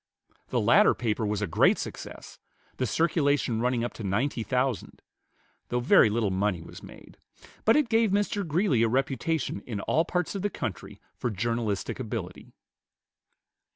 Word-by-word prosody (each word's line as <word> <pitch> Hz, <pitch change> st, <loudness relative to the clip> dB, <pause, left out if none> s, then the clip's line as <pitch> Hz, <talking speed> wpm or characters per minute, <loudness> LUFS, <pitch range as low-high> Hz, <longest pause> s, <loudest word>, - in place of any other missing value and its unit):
The -, -, 0 dB
latter -, -, +5 dB
paper 110 Hz, -2 st, -1 dB
was 105 Hz, 0 st, -1 dB
a -, -, +2 dB
great 80 Hz, -, +3 dB
success, -, -, -8 dB, 0.4 s
the 130 Hz, -, 0 dB
circulation 145 Hz, -, +1 dB
running 125 Hz, -1 st, +1 dB
up 120 Hz, -, -3 dB
to 115 Hz, -, -8 dB
ninety 115 Hz, +6 st, -1 dB
thousand, 125 Hz, 0 st, -2 dB, 0.7 s
though 120 Hz, -, 0 dB
very 120 Hz, -2 st, +5 dB
little 105 Hz, -2 st, 0 dB
money 95 Hz, -1 st, 0 dB
was -, -, -11 dB
made; -, -, -14 dB, 0.5 s
but 225 Hz, -, +5 dB
it 300 Hz, -3 st, +3 dB
gave 225 Hz, -1 st, +3 dB
Mr. 205 Hz, +1 st, 0 dB
Greeley 165 Hz, -, +1 dB
a 115 Hz, -, +4 dB
reputation 135 Hz, 0 st, -1 dB
in 110 Hz, -5 st, -4 dB
all 160 Hz, -, +2 dB
parts 180 Hz, +1 st, -2 dB
of 200 Hz, -, -4 dB
the 205 Hz, -, 0 dB
country 105 Hz, -, -6 dB
for 125 Hz, -, -3 dB
journalistic 110 Hz, 0 st, -2 dB
ability. -, -, -6 dB
125 Hz, 155 wpm, -27 LUFS, 110-160 Hz, 0.7 s, latter